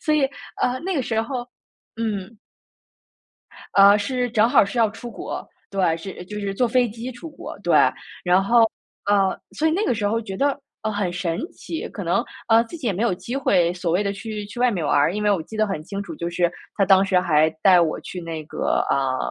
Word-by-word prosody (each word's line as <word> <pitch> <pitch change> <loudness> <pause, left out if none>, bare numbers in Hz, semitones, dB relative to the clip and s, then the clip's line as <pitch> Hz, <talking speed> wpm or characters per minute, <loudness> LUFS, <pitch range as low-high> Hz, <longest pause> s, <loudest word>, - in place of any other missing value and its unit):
所 305 - +1
以 300 - +3 0.4
呃， 250 +1 +1
那 380 +2 -2
个 280 - +1
时 225 -2 0
候 245 +1 -4 0.5
嗯。 220 -1 -3 1.4
呃， 200 +1 +7
是 250 +2 -1
正 225 0 +4
好 245 - +5
是 200 +5 -4
要 225 -2 +5
出 235 +2 -9
国， - - -6 0.2
对， 185 -5 +1
是 180 +1 -8
就 210 +2 -6
是 195 -1 -3
坐 245 +4 +2
飞 245 0 +3
机 230 +4 -6
出 245 +8 -9
国， - - -9
对。 - - +2 0.5
然 180 +2 +4
后， 235 +4 +4 0.5
呃， 200 -2 +2 0.2
所 315 - +2
以 - - +2
那 380 +7 +1
个 325 - +1
时 210 -2 -1
候 225 +2 +1
觉 195 -4 -6
得， 280 0 +1 0.2
呃， 215 0 -1
很 200 -4 -1
神 175 -2 -2
奇。 325 - -6
可 - - -7
能 - - +1 0.2
呃， 225 +1 +6
自 235 - -9
己 295 -7 -6
也 205 - +2
没 190 - -2
有 235 -5 +2
机 240 +8 -5
会 180 -10 +2
所 175 -1 -2
谓 185 - +2
的 200 -1 -1
去 210 0 -6
去 205 +4 -10
外 250 - +4
面 180 -8 -2
玩 - - +2
儿， 150 +5 +3
因 210 - -2
为 210 - +3
我 185 -5 +1
记 220 +7 -10
得 215 0 +2
很 195 -6 -3
清 200 +4 -5
楚， 175 -5 -8
就 170 - -3
是 175 0 +1 0.3
他 200 - +3
当 195 0 +5
时 185 -2 +3
还 155 -3 +3
带 185 -2 +7
我 160 -2 0
去 180 - -7
那 165 -2 -5
个， - - -1
啊， 135 -1 +1
205 Hz, 250 characters per minute, -23 LUFS, 180-235 Hz, 1.4 s, 呃